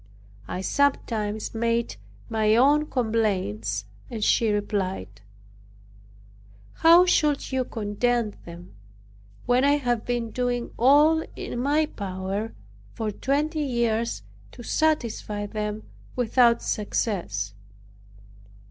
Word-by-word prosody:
I 185 - -4
sometimes 220 -4 0
made 230 - -1 0.3
my 220 -1 +2
own 290 +5 +4
complaint 190 - -1 0.3
and 220 -3 -4
she 225 +1 +3
replied, 190 - -2 1.6
"How 340 +2 +7
should 300 -6 +1
you 260 -1 +1
content 225 +1 -1
them, 170 -3 -11 0.7
when 245 +1 +3
I 285 +1 +4
have 245 -5 -1
been 240 -2 -2
doing 245 0 -2
all 300 +6 +5
in 240 - -5
my 290 +4 +2
power 195 -1 -4 0.4
for 220 -1 -2
twenty 295 +8 -1
years 235 - -1 0.3
to 240 - -10
satisfy 230 -8 -1
them 210 0 -4 0.3
without 240 -1 +3
success?" 170 - -2
230 Hz, 100 wpm, -25 LUFS, 205-260 Hz, 1.6 s, How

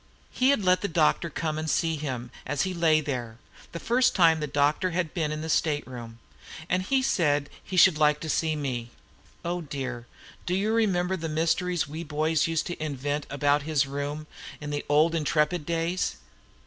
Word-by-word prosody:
He 255 +1 +2
had 280 -7 +3
let 180 0 +4
the 200 - 0
doctor 165 0 +2
come 155 -1 -3
and 155 0 -3
see 165 0 +1
him 130 -5 -5
as 140 +1 -1
he 185 - -2
lay 160 -3 +3
there, 120 -6 -4 0.3
the 170 - -6
first 245 +5 +2
time 165 -4 +5
the 150 - -2
doctor 145 +5 +1
had 175 -2 -2
been 160 -4 -1
in 155 0 -4
the 160 - -4
state 155 -2 +1
room, 120 -3 -9 0.5
and 180 +1 +1
he 260 +7 +1
said 145 - +1
he 185 - -5
should 175 -3 +6
like 150 -1 +4
to 160 - -5
see 155 0 0
me. 125 -5 -3 0.6
Oh, 175 +1 -2
dear! 130 -5 -5 0.4
do 180 - +1
you 210 +3 +1
remember 190 -5 +1
the 165 -1 -4
mysteries 165 +2 0
we 155 +3 -6
boys 155 +1 +1
used 165 -1 0
to 175 -2 -5
invent 145 0 -3
about 145 +1 +2
his 150 -1 +1
room 145 +2 -4 0.3
in 150 -1 -6
the 145 0 -2
old 155 +3 +4
'Intrepid' 150 0 0
days? 170 +2 -1
155 Hz, 190 wpm, -27 LUFS, 145-175 Hz, 0.6 s, should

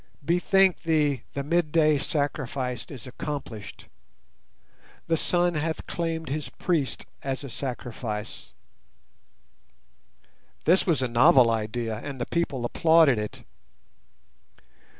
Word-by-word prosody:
Bethink 185 +3 +3
thee 150 -5 +1
the 140 - -3
midday 155 -1 +2
sacrifice 135 -4 -2
is 135 -6 -9
accomplished; 125 -5 -6 1.2
the 165 - +1
Sun 175 +2 +1
hath 160 +1 -2
claimed 165 -1 -3
his 150 +2 -3
priest 150 -9 -1 0.2
as 135 0 -3
a 140 - -7
sacrifice." 115 -4 -5 2.1
This 185 +4 +4
was 155 -7 +2
a - - +1
novel 120 0 +6
idea, 115 0 -2
and 135 +3 -7
the 120 - -1
people 140 -8 -1
applauded 160 -2 +4
it. 105 0 -6
140 Hz, 105 wpm, -26 LUFS, 125-165 Hz, 2.1 s, novel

